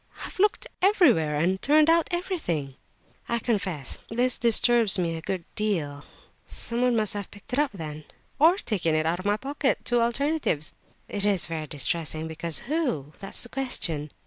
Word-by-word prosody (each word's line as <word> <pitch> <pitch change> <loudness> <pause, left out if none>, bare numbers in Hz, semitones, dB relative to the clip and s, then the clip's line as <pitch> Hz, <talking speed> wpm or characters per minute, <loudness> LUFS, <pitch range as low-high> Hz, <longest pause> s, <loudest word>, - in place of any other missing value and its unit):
"I've - - -9
looked 415 +2 +2 0.2
everywhere, 290 - +4
and 180 +5 0
turned 300 +2 +4
out 330 0 +4
everything." 320 - -2 0.6
"I 235 - +2
confess 190 - -2
this 245 +2 0
disturbs 235 -2 +5
me 170 -2 -1
a 160 - -6
good 180 0 -4
deal. 160 -9 -2 0.4
Someone 240 +1 0
must 215 -1 +1
have 205 -2 -5
picked 205 +4 -14
it 265 - +1
up, 295 -2 +2
then." 155 -5 -7 0.3
"Or 330 +5 +6
taken 180 - -1
it 155 0 +1
out 170 +2 0
of 185 - -8
my 205 +1 +2
pocket—two 265 -2 0
alternatives." 240 - 0 0.3
"It 205 - -4
is 200 -3 +2
very 160 -2 -5
distressing, 155 +2 -1
because 160 0 -2
who—? 245 - -2
That's 195 - -2
the 240 - -6
question!" 170 - -1
205 Hz, 165 wpm, -26 LUFS, 160-255 Hz, 0.6 s, Or